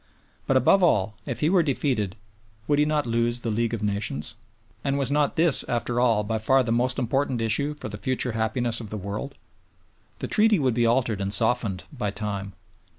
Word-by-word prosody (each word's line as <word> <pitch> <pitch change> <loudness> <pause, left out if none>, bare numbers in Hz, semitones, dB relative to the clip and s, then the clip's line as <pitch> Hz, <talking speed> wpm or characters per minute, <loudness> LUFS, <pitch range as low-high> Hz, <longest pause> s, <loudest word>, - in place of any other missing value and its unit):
But 135 - +3
above 160 +10 +4
all, 105 - +2
if 120 -3 -4
he 155 - +2
were 185 -2 +4
defeated, 130 - -1 0.5
would 145 0 +2
he 150 - +4
not 150 -1 0
lose 120 +1 0
the 115 - -2
League 115 +1 -1
of 110 - -6
Nations? 100 -5 -3 0.5
And 140 0 0
was 140 -1 0
not 145 0 +1
this, 165 -3 +6
after 120 0 -1
all, 115 -4 +2
by 110 +1 -2
far 130 +4 +3
the 115 - -3
most 120 +2 +1
important 130 0 -1
issue 130 +7 0
for 150 - -7
the 105 -1 -7
future 130 0 -1
happiness 115 +2 -1
of 110 - -9
the 105 - -5
world? 105 +8 -6 0.8
The - - -5
Treaty 215 0 +4
would 130 -6 +1
be 120 0 +2
altered 115 -4 +1
and 95 0 -2
softened 110 -4 +1
by 120 -7 -3
time. 100 -1 -5
120 Hz, 200 wpm, -25 LUFS, 110-135 Hz, 0.8 s, this